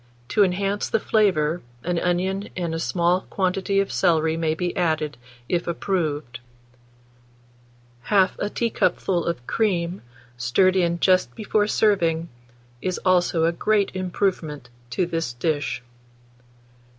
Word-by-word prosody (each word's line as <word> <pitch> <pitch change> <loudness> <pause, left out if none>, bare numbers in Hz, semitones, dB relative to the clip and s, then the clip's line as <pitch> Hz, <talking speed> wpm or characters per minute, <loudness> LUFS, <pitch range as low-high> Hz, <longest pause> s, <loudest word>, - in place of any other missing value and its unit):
To 210 - +4
enhance 195 +2 0
the 225 - +2
flavour, 180 -8 +2 0.2
an 175 -1 0
onion 190 +3 -1
and 170 -3 -2
a 165 - -2
small 175 +2 +1
quantity 195 +1 0
of 195 - 0
celery 160 -3 +2
may 160 -1 0
be 175 +1 -2
added, 155 -4 0 0.3
if 175 -1 -1
approved; 155 -8 -2 1.7
1/2 195 -2 +4
a 205 - -1
teacupful 195 -6 0
of 145 -8 -3
cream, 185 - 0 0.4
stirred 125 +11 +3
in 170 -2 +1
just 185 0 +3
before 210 -2 +1
serving, 170 -7 +2 0.5
is 185 -1 -1
also 175 -3 +3
a 165 - +3
great 200 +3 +1
improvement 175 -8 -2 0.2
to 175 +9 0
this 165 -7 -2
dish. 145 0 -2
175 Hz, 125 wpm, -23 LUFS, 165-195 Hz, 1.7 s, To